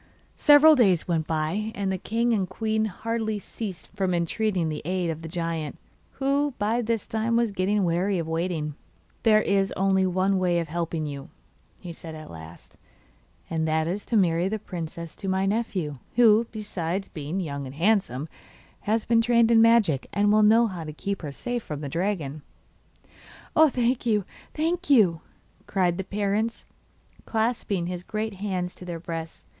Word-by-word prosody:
Several 295 +1 +7
days 195 - +3
went 165 -3 0
by, 165 +8 -1
and 195 -1 -1
the 190 - -1
king 230 +4 0
and 190 -5 0
queen 220 +2 0
hardly 220 +1 -2
ceased 200 -2 -7
from 185 -2 0
entreating 175 +1 0
the 155 -1 -3
aid 180 0 -1
of 160 0 -6
the 165 - -7
giant, 165 -3 -3 0.4
who 280 0 0
by 220 +3 +1
this 230 -1 -1
time 225 +1 -1
was 235 -2 +2
getting 195 +1 +1
weary 180 +3 +1
of 165 -2 -3
waiting. 165 -2 -2 0.5
'There 215 -1 +5
is 195 -1 +1
only 190 0 +3
one 190 +1 +1
way 180 -2 +2
of 165 -2 -2
helping 165 -1 -2
you,' 140 -2 -6 0.5
he 175 -3 -7
said 160 -1 -9
at 155 0 -10
last, 80 0 -12 0.7
'and 160 -1 -1
that 160 0 +1
is 195 +4 -3
to 230 - +2
marry 175 -2 +2
the 220 - -1
princess 170 -4 -7
to 195 - -7
my 190 0 +1
nephew, 195 - -2 0.2
who, 230 -1 +5
besides 195 -3 -3
being 155 +4 -4
young 140 -6 -4
and 130 - -9
handsome, 165 - +1 0.5
has 220 +1 0
been 230 -1 +4
trained 235 -1 +4
in 225 -1 +6
magic, 225 - +4
and 205 0 +2
will 215 +1 +5
know 225 +3 +6
how 185 -6 -4
to 155 -1 -7
keep 200 +6 -4
her 150 -4 -5
safe 245 +11 -3
from 150 -7 -6
the 145 - -4
dragon.' 165 -3 -2 1.1
'Oh, 315 0 +7
thank 245 -1 0
you, 210 -4 +2 0.3
thank 335 +3 -1
you!' 195 - +5 0.5
cried 180 -2 +1
the - - -1
parents, 205 +3 -1 0.6
clasping 220 -5 0
his 180 0 -4
great 215 +2 -3
hands 185 -3 -2
to - - -13
their 170 -2 -5
breasts. 165 -1 -6
190 Hz, 175 wpm, -26 LUFS, 165-220 Hz, 1.1 s, Several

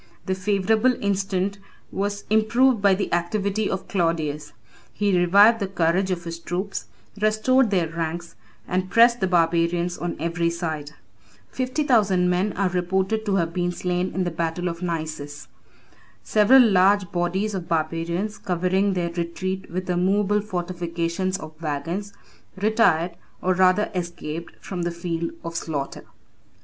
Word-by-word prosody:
The 190 - 0
favorable 210 +5 +2
instant 195 0 -1 0.3
was 205 +1 -2
improved 230 +2 +3
by 200 -1 +5
the 195 -2 -3
activity 200 +4 0
of 190 - -4
Claudius. 155 -5 -1 0.4
He 205 -2 +1
revived 200 +6 +6
the 200 - -1
courage 185 +1 +1
of 175 -2 -2
his 170 0 -6
troops, 185 +4 -4 0.3
restored 215 +4 +3
their 180 -5 +1
ranks, 165 +1 -4 0.3
and 185 +1 -1
pressed 235 +2 +5
the 190 - +1
barbarians 170 0 +1
on 175 0 -3
every 170 0 0
side. 160 -3 -4 0.6
Fifty 260 +4 -1
thousand 200 -9 +3
men 185 +4 +1
are 195 -1 0
reported 190 +4 -1
to 200 - +2
have 165 -3 0
been 175 -1 0
slain 180 +1 -2
in 185 - +1
the 175 - -2
battle 165 +2 -2
of 170 +1 -7
Naissus. 155 -4 -4 0.8
Several 235 +5 +6
large 195 -1 +3
bodies 185 +4 -1
of 180 -3 -4
barbarians, 170 +5 -1
covering 185 +2 +1
their 175 -2 -1
retreat 185 +2 -4
with 185 +2 -4
a 180 -1 0
movable 205 +3 +2
fortification 175 -2 -3
of 155 0 -9
wagons, 165 +7 -3 0.4
retired, 195 -5 +2 0.3
or 185 - +1
rather 185 +3 +3
escaped, 170 -2 -5
from 180 -2 -5
the 175 - 0
field 170 -1 -3
of 165 0 -6
slaughter. 145 -4 -4
180 Hz, 145 wpm, -24 LUFS, 170-200 Hz, 0.8 s, revived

